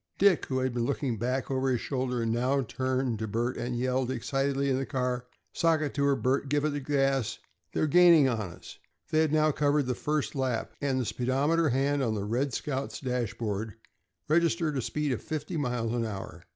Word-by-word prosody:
Dick, 195 -4 +4
who 130 - -1
had 130 -1 0
been 120 -1 0
looking 135 -5 -1
back 130 +3 -1
over 135 0 +1
his 125 -2 +1
shoulder, 125 -3 -2
now 125 +5 +1
turned 130 -2 -1
to 110 - -2
Bert 120 +4 -1
and 120 0 -3
yelled 130 +1 0
excitedly 135 +2 0
in 130 - +2
his 135 - -3
ear, 125 -1 -1 0.3
"Sock 165 -2 +2
it 145 -2 -2
to 140 - 0
her, 140 -1 +3
Bert! 135 +1 0
Give 145 +1 +1
her 155 - +2
the 145 -1 -2
gas! 135 -4 0 0.3
They're - - +1
gaining 165 -2 +6
on 110 -6 -1
us!" 85 - -12 0.3
They 155 - +3
had 160 -2 +3
now 155 0 +3
covered 145 0 +2
the 125 - 0
first 150 +3 -1
lap, 130 -4 -2
and 135 -2 +1
the 125 - -1
speedometer 145 +8 +1
hand 140 +3 +1
on 115 -4 0
the 100 - -2
"Red 125 +6 0
Scout's" 130 -4 -3
dashboard 110 -4 -3 0.5
registered 155 -2 +2
a 130 - 0
speed 150 +4 -1
of 125 - -2
fifty 155 +3 -4
miles 120 -6 -1
an 120 -1 0
hour. 100 -3 -7
130 Hz, 205 wpm, -29 LUFS, 120-145 Hz, 0.5 s, gaining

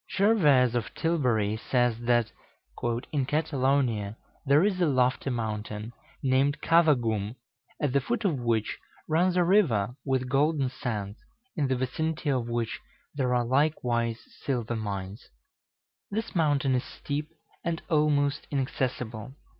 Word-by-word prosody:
Gervase 150 - +4
of 115 -4 -2
Tilbury 125 -11 +1
says 120 0 +1
that 120 -1 +2 0.8
"in 140 -4 0
Catalonia 130 -8 0 0.3
there 145 +4 +5
is 195 -3 +1
a 175 - +4
lofty 130 -1 +1
mountain, 110 -1 -4 0.3
named 135 +2 +2
Cavagum, 120 -10 +2 0.4
at 145 -4 0
the 140 - +3
foot 235 - -2
of 160 -9 +1
which 115 -3 -1 0.3
runs 175 +3 +2
a 180 - +5
river 145 - +3
with 130 -2 0
golden 140 +1 +2
sands, 105 -7 -4 0.4
in 150 -6 +1
the 130 - +1
vicinity 150 +4 -1
of 125 -3 -1
which 120 -1 -2 0.3
there 125 -3 0
are 120 -1 +1
likewise 120 -4 +1 0.2
silver 120 -4 -1
mines. 100 -1 -5 0.8
This 220 +3 -3
mountain 145 -5 +2
is 125 - +1
steep, 150 +1 -5 0.3
and 170 -1 -1
almost 145 -2 +1
inaccessible. 125 -3 -3
130 Hz, 130 wpm, -28 LUFS, 115-150 Hz, 0.8 s, there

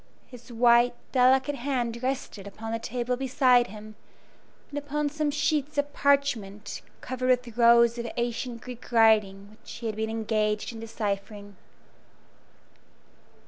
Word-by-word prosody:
His 245 -1 -14
white, 240 +1 +4 0.2
delicate 265 +2 +3
hand 240 -3 -2
rested 255 -6 -4
upon 225 +2 -7
the 230 - -2
table 245 +2 -2
beside 255 -1 +3
him, 215 +1 -11 0.8
and 290 - -3
upon 290 +1 -2
some 305 0 -1
sheets 295 0 -1
of 285 0 -1
parchment 220 -8 0 0.2
covered 255 0 -3
with 250 -3 +1
rows 235 0 +5
of 235 - -4
ancient 235 0 -3
Greek 250 -1 -10
writing 210 -4 +3
which 215 - -13
he 235 - -8
had 220 -2 -2
been 220 +1 -2
engaged 215 -1 -1
in 225 - -9
deciphering. 205 -2 -5
235 Hz, 135 wpm, -27 LUFS, 220-255 Hz, 0.8 s, rows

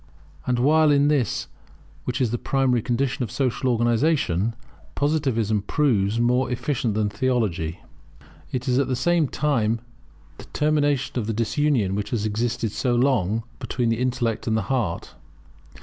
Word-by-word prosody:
And 125 -1 +1
while 155 +5 +4
in 145 0 +4
this, 135 -8 0 0.6
which 125 - -2
is 120 -4 +1
the 120 - -2
primary 130 -3 +1
condition 130 +3 -1
of 120 - -2
social 130 -1 -1
organization, 120 - +1 0.4
Positivism, 130 -8 +1
proves 110 -4 +1
more 125 +2 +2
efficient 125 -3 -1
than 105 -1 +1
Theology, 100 -8 -1 0.7
it 125 0 -3
at 130 +2 +2
the 130 - 0
same 170 +2 +2
time 120 -6 0 0.7
terminates 145 -3 +1
the 125 - -2
disunion 115 -2 +1
which 100 +1 -3
has 110 -4 -1
existed 115 +1 -1
so 125 +2 0
long 115 -4 +1 0.2
between 120 -3 -1
the 115 0 0
intellect 120 -3 -1
and 110 -1 +2
the 110 - -1
heart. 105 -10 -2
120 Hz, 140 wpm, -24 LUFS, 110-135 Hz, 0.7 s, while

